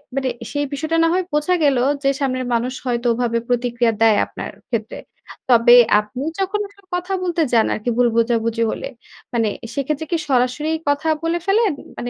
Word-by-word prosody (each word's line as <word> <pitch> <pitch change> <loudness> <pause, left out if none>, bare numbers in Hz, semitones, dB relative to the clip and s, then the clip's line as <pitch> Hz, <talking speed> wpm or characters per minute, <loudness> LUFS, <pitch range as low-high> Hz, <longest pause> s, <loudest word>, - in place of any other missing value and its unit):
মানে 265 -1 0 0.2
সেই 290 0 -1
বিষয়টা 315 +3 -1
না - - +4
হয় 370 +1 +1
বোঝা 300 +5 +2
গেল। 280 -3 +3 0.3
যে 275 - +3
সামনের 255 -2 -1
মানুষ 245 +2 0
হয়তো 240 -1 -1
ওভাবে 235 0 -1
প্রতিক্রিয়া 240 -1 +1
দেয় 220 -2 +5
আপনার - - -7 0.2
ক্ষেত্রে। 225 -2 -3 0.5
তবে 240 0 +7 0.2
আপনি 210 +5 -6 0.2
যখন 390 +2 -1
আসলে 400 0 -23
কথা 360 +2 -3
বলতে 345 -2 0
যান 225 -1 +5
আরকি 215 +3 -3
ভুল 245 -1 +4
বোঝাবুঝি 230 0 +1
হলে, - - -5 0.5
মানে 230 -2 +1 0.2
সেক্ষেত্রে 290 +2 -2
কি 340 - +2
সরাসরি 255 +4 +1 0.2
কথা 285 +2 0 0.2
বলে 335 +1 0
ফেলেন? 410 -1 +2 0.2
মানে 245 - -4
255 Hz, 175 wpm, -20 LUFS, 235-315 Hz, 0.5 s, তবে